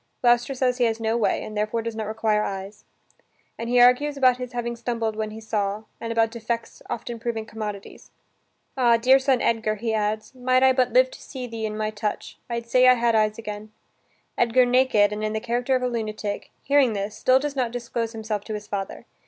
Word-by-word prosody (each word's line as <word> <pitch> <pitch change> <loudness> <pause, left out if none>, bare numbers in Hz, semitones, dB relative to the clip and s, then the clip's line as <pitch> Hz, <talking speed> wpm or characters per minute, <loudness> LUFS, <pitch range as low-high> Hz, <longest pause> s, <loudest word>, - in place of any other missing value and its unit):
Gloucester 240 +2 +3
says 255 -1 0
he 245 - +4
has 225 -1 0
no 225 0 0
way 235 - +1
and 215 - -8
therefore 215 +2 -1
does 230 -1 -4
not 220 -1 -4
require 215 -1 +1
eyes. 195 +1 -6 0.7
And 230 0 -5
he 245 0 +3
argues 255 +4 +4
about 255 -2 +4
his 250 -1 -6
having 235 0 -3
stumbled 230 -2 -2
when 215 0 -3
he 215 +1 -9
saw, 210 -1 -2 0.2
and 230 - -4
about 225 -1 +2
defects 230 0 -4
often 235 0 -5
proving 225 -1 -3
commodities. 210 -3 -7 0.7
"Ah! 240 -3 +4
dear 260 +3 +5
son 265 -2 +1
Edgar," 220 -2 +1
he 225 +1 -2
adds, 215 +1 -2
"might 255 0 +2
I 260 0 +6
but 255 -1 +1
live - - +4
to - - -12
see 260 -3 -7
thee 225 -2 -4
in 215 0 -5
my 215 0 -1
touch, 210 0 -4
I'd 235 -1 -3
say 255 +2 +4
I 255 - +7
had 235 -1 +1
eyes 215 -1 +2
again." 210 -1 -7 0.7
Edgar 240 +2 +4
naked, 245 -5 +3
and 210 +1 -4
in 215 0 -1
the 220 - -1
character 245 +3 0
of 255 - -1
a - - +2
lunatic, 215 -3 -4
hearing 275 -4 +3
this, 205 +1 -4
still 255 +4 +4
does 285 +1 -3
not 255 -3 0
disclose 235 -1 -3
himself 220 -2 -4
to 215 - -4
his 210 0 -7
father. 200 -2 -5
230 Hz, 215 wpm, -24 LUFS, 215-250 Hz, 0.7 s, I